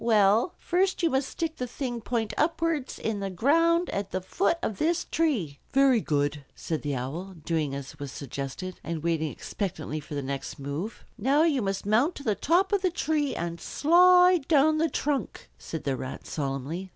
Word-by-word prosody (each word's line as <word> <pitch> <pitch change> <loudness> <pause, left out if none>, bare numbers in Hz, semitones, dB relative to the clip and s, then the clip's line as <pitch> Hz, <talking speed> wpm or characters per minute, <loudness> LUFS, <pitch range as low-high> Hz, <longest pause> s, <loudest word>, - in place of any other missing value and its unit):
"Well, 220 - +4
first 370 +1 0
you 330 - +3
must 265 0 0
stick 325 -1 -3
the 250 - -3
thing 240 -1 -4
point 225 -1 -2
upwards 320 -3 0
in 220 -2 -2
the 195 -1 -2
ground 330 - +3
at 200 -1 -3
the 185 - -2
foot 335 - 0
of 205 - -2
this 340 +2 +1
tree." 225 - 0
"Very 270 -3 +5
good," 145 -3 0
said 160 -2 -3
the 145 -2 -2
Owl, 160 +10 -5
doing 155 -5 0
as 140 +2 -8
was 140 -2 -5
suggested, 140 +7 -6
and 165 -2 -4
waiting 160 -3 0
expectantly 155 -6 -4
for 150 0 -8
the 140 - -2
next 135 0 -4
move. 145 +10 -5 0.2
"Now 275 +8 +3
you 300 -6 +2
must 195 -1 -2
mount 235 - +3
to 280 - -8
the 220 - +2
top 360 - +2
of 400 - +3
the 370 - +2
tree 310 -4 0
and 170 0 -4
slide 360 0 +5
down 310 0 +4
the 325 +1 +2
trunk," 280 - -2
said 160 - -6
the 135 -2 0
Rat 130 +1 -6
solemnly. 145 +6 -4
215 Hz, 190 wpm, -27 LUFS, -, 0.2 s, Very